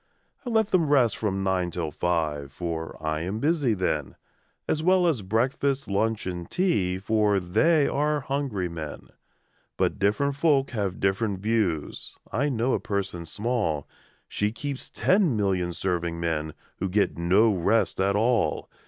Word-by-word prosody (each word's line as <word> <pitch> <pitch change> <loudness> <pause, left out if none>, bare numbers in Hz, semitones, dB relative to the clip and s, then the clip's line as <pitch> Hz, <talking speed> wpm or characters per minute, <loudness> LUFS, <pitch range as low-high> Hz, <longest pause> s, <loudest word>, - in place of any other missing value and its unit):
I 250 - -4
let 220 -2 +2
them 165 -5 +3
rest 125 -7 +4
from 95 -3 -2
nine 95 -2 0
till 85 -3 -3
five. 75 -5 -1
For 80 +1 -5
I 80 0 -1
am 95 +5 -3
busy 145 -3 +1
then, 90 -1 -2 0.5
As 155 - 0
well 185 +2 +4
as 155 -10 +1
breakfast, 130 +7 0
lunch, 110 +2 0
and 90 -2 -5
tea, 100 - +1
For 105 0 +2
they 140 - +3
are 150 +1 0
hungry 135 -9 -2
men: 80 -3 -7 0.7
But - - 0
different 110 +8 +1
folk 140 -2 +2
have 100 -5 -2
different 95 +1 0
views: 100 -7 -1
I 140 +7 +1
know 125 0 0
a - - +1
person 95 -4 -3
small 105 - -1 0.4
She 105 0 -1
keeps 135 +4 -5
ten 185 - +2
million 95 -4 0
serving 85 -2 -2
men, 80 -2 -2 0.2
Who 95 - -2
get 100 +2 +1
no 95 +6 +3
rest 100 +2 +1
at 100 +1 +2
all! 115 +1 +1
105 Hz, 155 wpm, -26 LUFS, 90-135 Hz, 0.7 s, rest